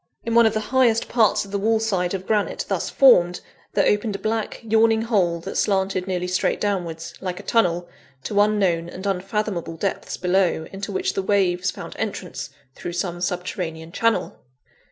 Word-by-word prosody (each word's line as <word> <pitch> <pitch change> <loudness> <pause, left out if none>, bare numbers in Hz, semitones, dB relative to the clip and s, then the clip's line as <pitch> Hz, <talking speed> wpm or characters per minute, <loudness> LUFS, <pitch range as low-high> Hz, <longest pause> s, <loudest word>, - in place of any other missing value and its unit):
In 230 - -2
one 235 -1 +6
of 220 - -1
the - - +2
highest 245 -4 +3
parts 225 -3 +2
of 195 - -13
the 200 - -1
wall 220 +2 +2
side 195 -5 0
of 190 0 -6
granite 210 -1 0
thus - - -1
formed, 180 -10 +5 0.3
there 200 - +3
opened 210 0 +1
a - - -1
black, 220 +1 -2
yawning 225 0 +3
hole 185 -7 +1
that 190 - -5
slanted 190 -2 0
nearly 180 -1 -1
straight 180 0 0
downwards, 175 -5 -2
like 185 -1 -4
a - - -9
tunnel, 175 -6 +1 0.4
to 205 -1 +2
unknown 190 -5 +1
and 190 +2 -8
unfathomable 195 -2 -2
depths 195 +3 -3
below, 180 -3 +1
into 195 +1 -5
which 190 - -1
the - - -1
waves 190 -2 +1
found - - -7
entrance 180 -9 -4 0.2
through 175 - -6
some 175 0 -3
subterranean 175 -2 -3
channel. 230 +4 0
195 Hz, 175 wpm, -23 LUFS, 180-215 Hz, 0.4 s, one